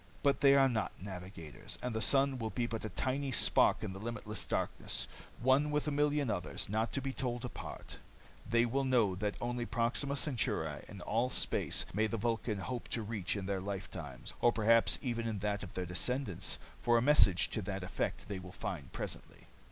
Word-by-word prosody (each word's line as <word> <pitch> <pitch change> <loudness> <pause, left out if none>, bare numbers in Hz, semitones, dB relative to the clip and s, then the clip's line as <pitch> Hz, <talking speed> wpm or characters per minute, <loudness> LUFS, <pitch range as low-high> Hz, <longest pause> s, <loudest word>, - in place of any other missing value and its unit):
But 140 -1 +3
they 140 -1 +7
are 135 -1 +6
not 115 -4 -1
navigators, 90 -4 -7
and 125 -2 -2
the 110 - -1
sun 135 0 +3
will 110 -1 -2
be 120 +1 -1
but 115 -1 -4
a 110 - -3
tiny 135 +3 -1
spark - - +4
in 95 - -3
the 95 - -8
limitless 105 -1 -2
darkness, - - -1 0.3
one 130 +5 +3
with 150 0 0
a - - +1
million 145 -3 +2
others, 90 -3 -2
not 110 +2 0
to 135 - 0
be 135 -1 -2
told 125 -1 -3
apart. 125 - -7 0.5
They 115 +1 +4
will 135 +4 0
know 120 -7 +3
that 105 +1 -2
only 120 0 -2
Proxima 125 +5 0
Centauri 130 -4 0
in 100 -3 -9
all 115 +7 0
space - - +2
may 110 +3 +2
the 115 - -2
Vulcan 115 -1 -1
hope 120 +5 -4
to 115 - -1
reach 105 -3 -2
in 100 -2 -3
their 95 -1 -1
lifetime, 90 -9 -6 0.2
or 120 - +5
perhaps 115 +1 +4
even 115 -3 -1
in 110 -2 -2
that 100 0 -1
of 95 - -8
their 90 - -2
descendants, 105 +4 0 0.2
for 120 0 +4
a - - +3
message 125 -11 +5
to 110 - -2
that 95 -1 -4
effect 90 -1 -3
they 100 -2 -4
will 90 0 -9
find 75 -7 -5
presently. - - -6
115 Hz, 200 wpm, -34 LUFS, 100-130 Hz, 0.5 s, they